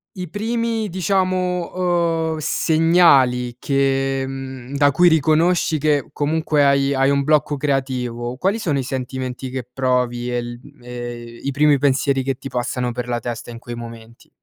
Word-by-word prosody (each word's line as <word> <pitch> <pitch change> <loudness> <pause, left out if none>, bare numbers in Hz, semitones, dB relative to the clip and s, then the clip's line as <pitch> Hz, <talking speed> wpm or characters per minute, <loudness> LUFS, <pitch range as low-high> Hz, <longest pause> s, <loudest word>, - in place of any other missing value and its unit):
i 180 -3 -6
primi 225 +1 -2
diciamo, 180 -3 0
uhm, - - -5
segnali 155 -7 +3
che, 135 -1 0
mhmm, 135 -1 -7
da 145 0 +4
cui 175 +5 +5
riconosci 160 +1 +2
che 145 -4 +1
comunque 150 0 +1
hai 140 0 +3
hai 135 +1 +2
un 140 0 +2
blocco 150 0 +2
creativo; 130 -3 -2
quali 200 +8 0
sono 150 -8 0
i - - -2
sentimenti 130 0 -4
che 130 -2 -5
provi 125 -2 0
e - - 0
il 120 0 -5 0.2
e 120 -1 -7
i 140 - -1
primi 145 +1 +4
pensieri 135 -1 +2
che 135 0 -1
ti 135 - -9
passano 125 0 -2
per 125 0 -5
la 120 -1 -1
testa 120 0 -6
in 115 - -8
quei 120 0 -8
momenti? 115 0 -11
135 Hz, 160 wpm, -20 LUFS, 125-160 Hz, 0.2 s, cui